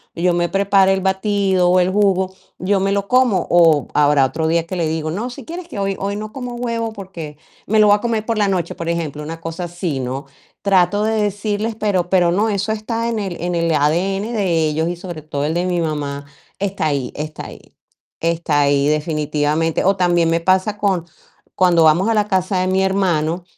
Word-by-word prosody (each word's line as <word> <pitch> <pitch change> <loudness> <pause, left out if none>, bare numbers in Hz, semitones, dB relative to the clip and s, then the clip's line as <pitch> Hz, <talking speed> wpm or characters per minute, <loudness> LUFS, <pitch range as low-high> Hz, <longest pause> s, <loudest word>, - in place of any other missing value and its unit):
yo 175 +1 +1
me 175 0 +1
prepare 195 0 +3
el 190 - -1
batido 190 -1 +1
o 185 +1 +4
el 180 - +1
jugo, 190 -2 +1 0.3
yo 195 +2 +1
me 195 +1 0
lo 200 0 -2
como". 250 -8 +3
O 165 -5 +4
habrá 145 -1 +4
otro 160 +4 -2
día 165 +1 +1
que 185 +2 -5
le 165 -2 0
digo: 155 0 -2
"No, 215 +9 -3
si 245 - -9
quieres 345 +1 -7
que - - -9
hoy 195 -1 -1
hoy 200 +1 -2
no 215 +1 -6
como 250 -1 -6
huevo 230 -2 -3
porque 175 -7 -8 0.3
me 220 +1 +2
lo 210 - +6
voy 205 - +6
a - - -10
comer 225 -2 -1
por 230 -1 -1
la 205 -1 +2
noche", 185 -3 -1
por 165 - -6
ejemplo, 165 -3 -3
una 165 +2 -7
cosa 165 +2 -5
así, 175 -5 -3
¿no? 130 +2 -4 0.3
Trato 195 +1 +2
de 220 -1 +1
decirles, 210 +2 -2
pero 195 -5 0
pero 175 -2 +3
no, 205 +5 +1
eso 200 0 -1
está 225 +2 -2
en 230 -2 -2
el 190 -4 -4
en 175 +1 -2
el 170 0 0
ADN 185 +9 0
de 180 -8 +1
ellos 160 +2 -1
y 175 - -2
sobre 175 -3 -8
todo 145 -2 -3
el 150 +2 -1
de 175 +2 0
mi 175 -2 0
mamá 145 -3 -3 0.4
está 195 -3 -2
ahí 140 -4 -2
está 155 0 -6
ahí - - -11 0.7
está 165 -3 +1
ahí 140 0 +2
definitivamente. 150 +1 0
O 195 +1 +2
también 175 -2 +2
me 165 0 +2
pasa 185 +4 +1
con 195 -5 0 0.5
cuando 175 -3 +4
vamos 160 +5 +4
a - - +3
la 210 -1 +1
casa 185 0 +1
de 185 - 0
mi 190 +1 +1
hermano, 180 -3 0
185 Hz, 215 wpm, -19 LUFS, 165-200 Hz, 0.7 s, lo